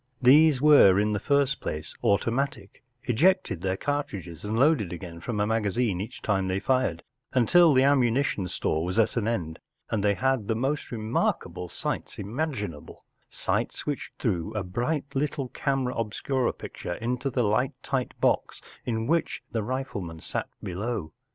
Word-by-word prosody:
These 140 +2 +6
were 140 -11 +7
in 105 +1 +1
the 105 - 0
first 140 +3 +1
place 75 0 -4
automatic, 115 +2 0 0.2
ejected 165 - +2
their 95 0 -1
cartridges 100 - -3
and 105 +2 -2
loaded 135 - +3
again 85 -1 -7
from 105 +4 -3
a 105 - +2
magazine 110 -2 0
each 105 - -8
time 95 -3 +1
they 95 +1 0
fired, 125 -9 0 0.3
until 160 +7 +6
the 130 -1 +5
ammuni¬ 135 -2 +4
tion 95 -10 -2
store 80 -2 -1
was 90 +4 -3
at 115 -1 +3
an 115 -3 0
end, 85 -9 -2 0.3
and 105 -3 0
they 100 -1 +3
had 130 -4 0
the 115 - +1
most 135 +6 -2
remarkable 110 -5 -1
sights - - -4
imaginable, 105 - -4 0.2
sights - - -2
which 145 -2 -3
threw 90 -9 -1
a 105 - -1
bright 125 - -1
little 140 -1 -1
camera 135 -2 -1
ohscura 120 +3 -1
picture 90 - -6
into 125 +4 -2
the 125 -1 0
light 125 +7 +1
tight 130 -2 -2
box - - +1 0.2
in 110 -2 -2
which 165 +5 0
the 115 - -1
rifle¬ 130 -3 -3
man 80 -1 -8
sat - - -4
below. 95 -1 -3
115 Hz, 165 wpm, -27 LUFS, 100-135 Hz, 0.3 s, were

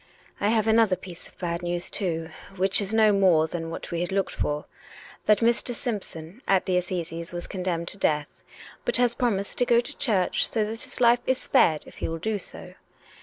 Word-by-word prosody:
" - - -27
I 205 - +2
have 220 0 +2
another 220 -3 +4
piece 180 -1 -11
of - - -20
bad 170 -1 -3
news, 175 0 -2
too 165 -5 -1
— 195 - -16
which 190 +2 +3
is 200 0 -2
no 220 -1 +5
more 185 -5 +4
than 165 0 -5
what 165 - -7
we 170 0 -1
had 175 - -2
looked 195 0 0
for: 150 0 -2 0.6
that 210 +1 +5
Mr. 235 +1 +1
Simpson 205 -4 -5
at 195 -1 +3
the 185 - 0
Assizes 170 -2 -3
was 175 0 -5
condemned 180 -3 -3
to 200 - -5
death, 150 -4 +1 0.6
but - - +3
has 245 -1 +3
promised 205 -6 -1
to 245 - +4
go 235 -1 +5
to 240 - -4
church, 200 -8 +1
so 225 - 0
that 225 +2 -4
his 285 -1 -5
life 240 0 +5
is 260 - +3
spared 155 -10 +3
if - - -14
he - - -2
will 165 - -3
do 210 +5 -2
so. - - -7
190 Hz, 220 wpm, -26 LUFS, 170-220 Hz, 0.6 s, no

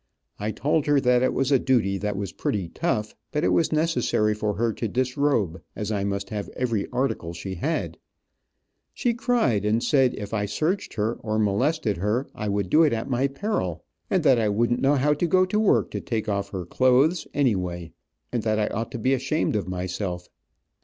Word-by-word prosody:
I 105 - -2
told 145 +7 0
her 145 -1 +4
that 125 -2 +3
it 130 - +2
was 135 +1 0
a 135 - +5
duty 110 -8 +1
that 105 0 -2
was 100 -1 -3
pretty 95 -5 -2
tough, 105 +4 -2 0.2
but 150 +1 -1
it - - +3
was 165 - +2
necessary 140 -9 +1
for 105 -1 -2
her 115 0 0
to 115 - -3
disrobe, 125 - 0
as 105 0 -3
I 100 -2 -1
must 100 +1 -3
have 105 -2 -4
every 115 -5 -1
article 125 -10 -2
she 95 +3 -6
had. 150 - -2 1.0
She 240 -2 +1
cried, 230 - +1
and 110 +3 +1
said 135 -4 +3
if 105 0 -7
I 105 -2 0
searched 160 - -1
her, 110 +2 -1
or 110 -1 -2
molested 110 - +1
her, 105 +9 0
I 105 -1 -4
would 100 -2 -1
do 155 - +6
it 155 -5 +4
at 115 +4 -3
my 130 +2 +2
peril, 135 - -3 0.3
and 185 - +1
that 135 -5 +5
I 110 -2 +1
wouldn't 120 +4 +1
know 140 +2 +4
how 145 +2 +3
to 160 +4 0
go 185 +3 +4
to 210 +3 0
work 215 - +3
to - - -4
take 110 -2 -3
off 100 -1 -1
her 95 -3 -5
clothes, 130 - +3
anyway, 90 - 0 0.4
and 120 - -1
that 110 0 0
I 105 -1 +1
ought 115 +2 -2
to - - -3
be 130 +4 +1
ashamed 135 0 0
of 105 - -1
myself. 90 0 -4
115 Hz, 205 wpm, -25 LUFS, 100-140 Hz, 1.0 s, do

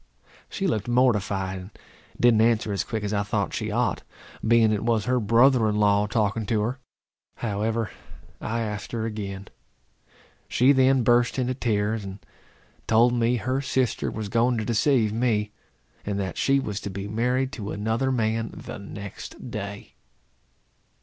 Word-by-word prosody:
She 195 - -3
looked 110 - 0
mortified, 105 -6 +1
and 90 +1 -10 0.5
didn't 120 -3 +5
answer 115 -2 +2
as 100 - 0
quick 110 -2 -4
as 105 0 -2
I 100 - +1
thought 100 - -1
she - - -2
ought, - - 0 0.4
being 115 -1 +4
it 105 -1 -1
was 115 -3 +1
her 125 0 +2
brother 115 +1 +4
in 105 - -1
law 105 0 +3
talking 105 0 0
to 110 -1 +1
her. 125 +5 -2 0.6
However, 110 0 -2 0.5
I 115 +1 -2
asked 105 -1 -5
her 115 -1 -1
again. 100 -3 -5 1.0
She 130 +3 +4
then 130 -1 +4
burst 120 +1 +3
into 130 -1 0
tears, 110 -3 -1
and 95 0 -7 0.7
told 115 +2 +4
me 120 0 +2
her 130 +3 -1
sister 130 -4 0
was 110 -1 -5
going 120 +3 +2
to 110 - -2
deceive 115 -1 +2
me; 110 -3 0 0.5
and 100 -1 -2
that 95 -3 -3
she 140 0 +2
was 105 -7 -3
to - - -5
be 100 +1 -5
married 125 +5 0
to 105 -7 -6
another 110 +6 -1
man 115 -2 0
the - - -8
next 100 +4 -9
day. 100 -1 -6
110 Hz, 160 wpm, -25 LUFS, 105-120 Hz, 1.0 s, didn't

